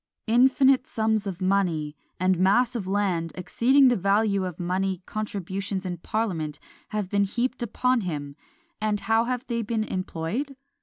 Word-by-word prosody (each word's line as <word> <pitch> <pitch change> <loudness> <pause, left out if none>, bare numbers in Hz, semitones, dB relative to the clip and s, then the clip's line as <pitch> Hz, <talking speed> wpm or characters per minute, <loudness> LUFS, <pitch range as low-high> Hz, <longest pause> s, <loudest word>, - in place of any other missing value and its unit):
"Infinite 260 +3 +4
sums 220 -6 0
of 190 -1 -4
money, 175 -6 +1 0.2
and 185 -1 +2
mass 215 +7 +3
of 205 -6 -3
land 190 -5 0
exceeding 250 +10 +4
the 245 - +4
value 200 0 +2
of 180 -4 -6
money, 185 +1 -1
contributions 195 -2 -4
in 180 -1 -3
parliament 170 -6 -2 0.3
have 210 -3 -2
been 200 +2 +2
heaped 245 +5 -2
upon 250 +1 +1
him; 145 -6 -4 0.5
and 210 -1 0
how 225 +1 +2
have 250 +1 -2
they 235 -3 -2
been 220 0 -1
employed? 185 - -3
200 Hz, 150 wpm, -26 LUFS, 185-235 Hz, 0.5 s, Infinite